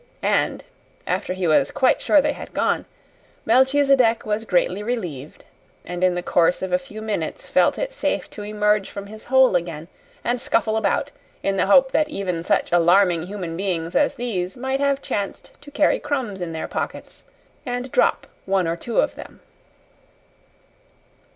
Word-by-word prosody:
And, - - +1 0.4
after - - -2
he 185 -1 -3
was 150 -3 +3
quite 260 - +2
sure 300 - +4
they 295 +1 0
had - - -10
gone, - - 0 0.6
Melchisedec 260 -1 +3
was 215 +1 -2
greatly 180 0 +1
relieved, 180 - -5 0.4
and 175 0 -4
in 180 -1 +3
the 175 - -3
course 175 +1 +2
of 185 -1 -3
a 180 - +3
few 215 +4 -10
minutes 205 -8 -3
felt - - +3
it - - -3
safe - - -1
to 210 - -8
emerge 210 -1 0
from 200 0 -7
his 215 +2 -11
hole 260 -5 +4
again 170 -2 -3 0.3
and 240 0 -1
scuffle 220 -1 +1
about 220 -3 0 0.3
in 195 - 0
the 190 - +1
hope 265 +6 +5
that 305 -1 +1
even 185 - -3
such - - 0
alarming 175 0 +4
human 185 -4 -5
beings 175 -3 -3
as 290 - +2
these 195 -5 -3
might 265 +2 -2
have 280 -1 0
chanced 200 -1 -4
to 290 - -12
carry 295 +1 +2
crumbs 240 -10 -3
in 175 -2 -3
their 160 -1 -4
pockets - - -5 0.4
and 245 -1 -4
drop - - +2 0.2
one 190 -3 +1
or 165 - -1
two 230 +7 -2
of - - -1
them. - - -12
205 Hz, 170 wpm, -22 LUFS, 180-250 Hz, 0.6 s, hope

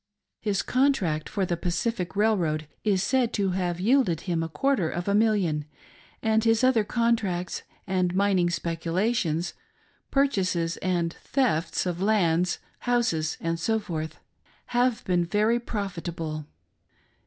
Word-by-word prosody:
His 205 -2 0
contract 245 - +1
for 200 -3 0
the 175 - -1
Pacific 180 +3 -2
Railroad 175 -8 +1 0.2
is 195 -3 +2
said 250 +2 +2
to 195 -3 +1
have 180 -2 -1
yielded 210 - +3
him 170 -3 -1
a 165 - -3
quarter 195 - +1
of 175 +2 -4
a 200 - +2
million, 200 -9 +2 0.6
and 220 0 +3
his 225 +1 +3
other 255 -4 +4
contracts 210 -6 0 0.2
and 185 -1 0
mining 190 -3 +3
speculations, 170 +1 -1 0.6
purchases 185 -12 +1
and 175 -2 0
thefts 235 - 0
of 175 -1 -2
lands, 180 -4 +2 0.2
houses, 230 -11 0 0.2
&c., 220 +7 0 0.9
have 245 -1 +1
been 180 -2 +2
very 210 +7 +2
profitable. 170 -8 -4
190 Hz, 120 wpm, -26 LUFS, 170-225 Hz, 0.9 s, other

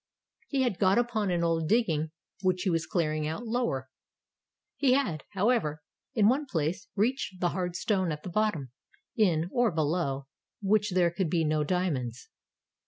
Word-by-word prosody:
He 275 -2 +1
had 225 -8 -1
got 190 +1 +4
upon 235 -4 +1
an 175 -1 +1
old 165 -1 +1
digging 165 -9 +2 0.3
which 185 -1 +1
he 190 - +1
was 165 -1 0
clearing 155 -3 0
out 160 +10 -4
lower. 225 - -1 0.9
He 270 -3 +3
had, 215 - 0
however, 195 -8 +1 0.3
in 210 -3 +5
one 275 +5 +2
place 175 - -2
reached 210 -3 0
the 175 - +2
hard 180 -1 -3
stone 190 -3 0
at 150 0 -5
the - - -5
bottom, 170 - 0 0.4
in, 175 -7 +2
or 245 -2 +3
below 150 -3 -1 0.3
which 205 -1 +2
there 175 -2 +3
could 175 -1 -1
be 165 -1 +2
no 155 -1 +1
diam.onds. 145 -8 -2
180 Hz, 165 wpm, -29 LUFS, 155-215 Hz, 0.9 s, in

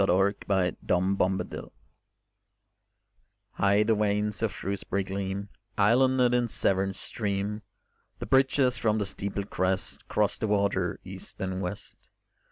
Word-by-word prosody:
XXVIII 95 +1 +3
THE 95 -2 +2
WELSH 95 +2 +2 0.2
MARCHES 90 - -6 1.8
High 100 +1 +3
the 110 +1 +3
vanes 105 0 0
of 110 -2 +1
Shrewsbury 100 +1 -2
gleam 95 +1 -4 0.3
Islanded 125 +4 +4
in 120 -1 +2
Severn 95 -3 +1
stream; 105 +1 -2 0.6
The - - -5
bridges 130 -1 +3
from 110 -1 +1
the 105 - 0
steepled 100 +1 -3
crest 95 +1 -1
Cross - - +1
the 110 - -1
water 100 -3 +1
east 95 0 -8
and 95 0 -2
west. 100 +2 -5
100 Hz, 125 wpm, -28 LUFS, 95-105 Hz, 1.8 s, Islanded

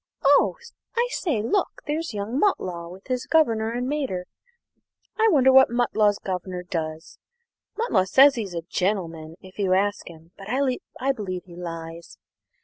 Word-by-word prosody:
Oh, 285 +1 +4 0.4
I 475 +1 +3
say, 285 - -1
look! 395 - -1
there's 315 +2 -2
young 215 +5 -3
Mutlow 180 - -1
and 190 - -17
his 255 -1 -2
governor 230 -9 +2
and 245 +2 -2
mater. 265 -11 -2 0.9
I 445 - +5
wonder 265 -7 +5
what 265 0 +7
Mutlow's 220 -4 +2
governor 180 -1 -5
does? 160 -2 -5 0.6
Mutlow 450 - +2
says 270 +8 +6
he's 205 -8 -5
a 165 - -3
'gentleman' 165 -4 -2
if 185 +2 -15
you 190 -2 +2
ask 205 0 0
him, 165 0 -15
but 195 - -10
I 260 +1 -1
believe 190 -7 -5
he 175 -2 -13
lies. 165 -1 -8
205 Hz, 150 wpm, -24 LUFS, 180-265 Hz, 0.9 s, what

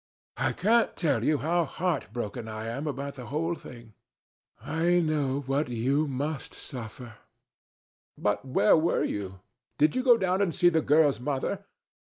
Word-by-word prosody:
I - - 0
can't 225 +5 +2
tell 140 -9 +1
you 150 +3 +3
how 170 +4 +1
heart 160 -5 -2
broken 115 -1 -5
I 110 0 -5
am 135 +7 -4
about 140 0 -4
the 125 -3 -9
whole 165 +4 -1
thing. 120 -8 -11 0.7
I 170 +2 +1
know 145 -4 0
what 140 +1 -1
you 135 +6 +1
must 140 +2 -4
suffer. 120 -2 -8 1.0
But 105 0 0
where 130 -5 +4
were 165 +1 +2
you? 95 -2 -4 0.4
Did 150 +10 +3
you 255 - +2
go 250 -2 +6
down 190 -1 +1
and 185 -5 0
see 175 - +5
the 160 -2 +2
girl's 145 -5 +3
mother? 145 +9 -2
145 Hz, 160 wpm, -28 LUFS, 120-165 Hz, 1.0 s, go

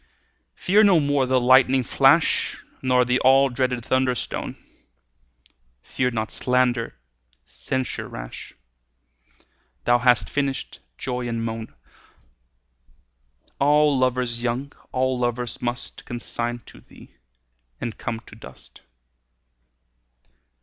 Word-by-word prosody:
Fear 210 +4 +4
no 190 -5 +5
more 145 -2 +1
the 130 0 +3
lightning 130 +1 +5
flash - - +3 0.2
Nor 125 -1 +3
the 125 +1 +1
all 135 +1 +5
dreaded 125 -2 -2
thunder 130 -1 +1
stone; - - -5 1.3
Fear 125 -1 -1
not 110 -3 -3
slander, 125 - 0 0.5
censure 130 -1 -4
rash; - - -9 1.3
Thou 120 - +3
hast 120 -1 +3
finished 140 -2 -3 0.2
joy 125 -1 -3
and 115 -1 -3
moan: 115 0 -6 1.8
All 150 +1 +4
lovers 125 -2 0
young, 125 +4 -3 0.2
all 130 0 0
lovers 120 -1 -2
must 120 0 -4
Consign 120 0 -4
to - - -14
thee, - - -17 0.7
and 115 - -4
come 115 -1 -4
to 110 - -15
dust. 65 -12 -14
125 Hz, 105 wpm, -23 LUFS, 120-130 Hz, 1.8 s, no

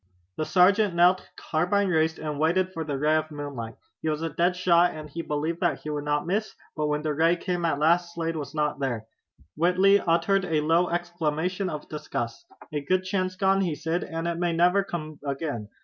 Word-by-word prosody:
The 155 - -1
sergeant 195 +1 +4
knelt, 180 +2 +4
carbine 185 +5 0
raised, 160 -1 +2
and 150 -2 -4
waited 185 +4 +1
for 165 - -3
the 145 -3 -3
ray 155 +3 +3
of 155 0 -2
moonlight. 140 -7 -6 0.3
He 160 - -1
was 155 +1 -2
a 165 - -2
dead 175 +4 +1
shot, 175 -1 +4
and 155 -1 -7
he 165 +3 -5
believed 155 +2 -2
that 175 -2 0
he 150 - -5
would 145 -1 -3
not 150 +2 0
miss, 205 +5 -2 0.2
but 150 -1 -1
when 150 0 -1
the 155 -1 0
ray 165 +3 +3
came 175 -1 -2
at 160 -4 +1
last 170 +3 +2
Slade 165 -1 -2
was 145 -1 -6
not 150 -1 0
there. 120 -5 -2 0.5
Whitley 185 +5 +4
uttered 180 +3 +2
a 160 -3 +1
low 165 +3 +2
exclamation 175 +2 -1
of 150 -3 -6
disgust. 135 -6 -5 0.3
"A 150 - -1
good 185 +5 +1
chance 185 -1 -1
gone," 195 +1 +2
he 170 -5 0
said, 165 +3 -2
"and 165 +1 -4
it 170 0 -2
may 175 -1 +1
never 180 +4 +3
come 155 -5 -6
again. 140 -6 -3
165 Hz, 210 wpm, -26 LUFS, 150-180 Hz, 0.5 s, sergeant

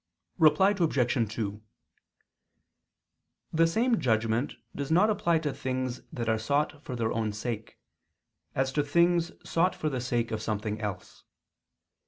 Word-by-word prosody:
Reply 190 +5 +6
Obj. 130 - +1
2: 105 -1 -3 1.9
The 165 +1 +4
same 230 +6 +2
judgment 115 +1 +1 0.2
does 140 -1 -4
not 185 +7 +4
apply 170 -5 +2
to 150 -3 -2
things 130 -1 -3
that 115 -2 -4
are 110 -1 +2
sought 145 +5 0
for 125 - -5
their 115 -2 -1
own 110 -2 -1
sake, 110 +1 -5 0.8
as 135 0 +1
to 145 - +1
things 170 +3 +3 0.2
sought 175 +3 +2
for 155 - -1
the 130 -3 -3
sake 120 -1 -1
of 110 -1 -2
something 110 0 -3
else. 105 -3 -6
130 Hz, 140 wpm, -29 LUFS, 115-165 Hz, 1.9 s, Reply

